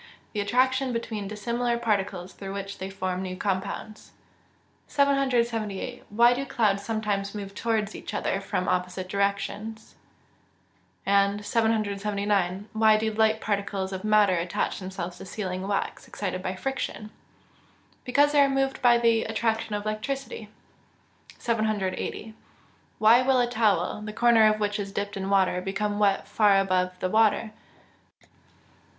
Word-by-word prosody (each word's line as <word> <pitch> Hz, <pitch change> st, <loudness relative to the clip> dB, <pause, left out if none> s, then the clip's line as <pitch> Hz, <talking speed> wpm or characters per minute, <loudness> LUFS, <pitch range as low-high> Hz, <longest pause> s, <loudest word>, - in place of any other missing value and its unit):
_ 205 Hz, -, +1 dB
Attraction 260 Hz, +5 st, +2 dB
between 225 Hz, -3 st, -3 dB
dissimilar 235 Hz, +3 st, -1 dB
particles 195 Hz, -5 st, -1 dB
through 195 Hz, 0 st, -7 dB
which 200 Hz, 0 st, -6 dB
they 190 Hz, -, -4 dB
form 185 Hz, -1 st, -3 dB
new 185 Hz, -1 st, -5 dB
compounds. 200 Hz, +3 st, -4 dB, 0.7 s
778. 245 Hz, -5 st, 0 dB
Why 235 Hz, +3 st, +5 dB
do 260 Hz, +3 st, -2 dB
clouds 210 Hz, -7 st, +1 dB
sometimes 210 Hz, -2 st, -2 dB
move 200 Hz, -1 st, -6 dB
towards 215 Hz, -1 st, -1 dB
each -, -, -7 dB
other 195 Hz, -, -1 dB
from 195 Hz, -2 st, -2 dB
opposite 180 Hz, +1 st, -1 dB
directions? 200 Hz, +3 st, -2 dB, 1.1 s
and 200 Hz, +1 st, +2 dB
779. 205 Hz, -3 st, 0 dB
Why 220 Hz, -1 st, +5 dB
do 220 Hz, 0 st, -1 dB
light 220 Hz, 0 st, +3 dB
particles 200 Hz, -2 st, -2 dB
of 190 Hz, +1 st, -5 dB
matter 215 Hz, -2 st, +4 dB
attach 175 Hz, +4 st, -2 dB
themselves 185 Hz, -2 st, -6 dB
to -, -, -8 dB
sealing 185 Hz, -2 st, -4 dB
wax, 200 Hz, -1 st, -2 dB
excited 185 Hz, -2 st, -4 dB
by 185 Hz, 0 st, -3 dB
friction? 215 Hz, -2 st, -4 dB, 0.9 s
Because 285 Hz, +3 st, +3 dB
they 290 Hz, -1 st, +5 dB
are 280 Hz, -, +5 dB
moved 270 Hz, 0 st, 0 dB
by 240 Hz, -1 st, +6 dB
the 230 Hz, -1 st, +2 dB
attraction 225 Hz, -1 st, -1 dB
of 205 Hz, -, -3 dB
electricity. 220 Hz, +1 st, -4 dB, 0.9 s
780. 215 Hz, -1 st, -2 dB, 0.7 s
_Why 230 Hz, +4 st, +6 dB
will 260 Hz, 0 st, +3 dB
a 245 Hz, -, +4 dB
towel, 220 Hz, -3 st, +1 dB
the 210 Hz, 0 st, -6 dB
corner 225 Hz, -2 st, +5 dB
of 215 Hz, -, -2 dB
which 210 Hz, 0 st, -1 dB
is 200 Hz, -1 st, -4 dB
dipped 200 Hz, +1 st, -3 dB
in 195 Hz, 0 st, -3 dB
water, 190 Hz, -2 st, +2 dB
become 205 Hz, +2 st, -2 dB
wet 200 Hz, -2 st, +2 dB
far 205 Hz, -3 st, +4 dB
above 185 Hz, -1 st, +1 dB
the 185 Hz, -, 0 dB
water? 220 Hz, 0 st, +3 dB
210 Hz, 140 wpm, -26 LUFS, 195-225 Hz, 1.1 s, by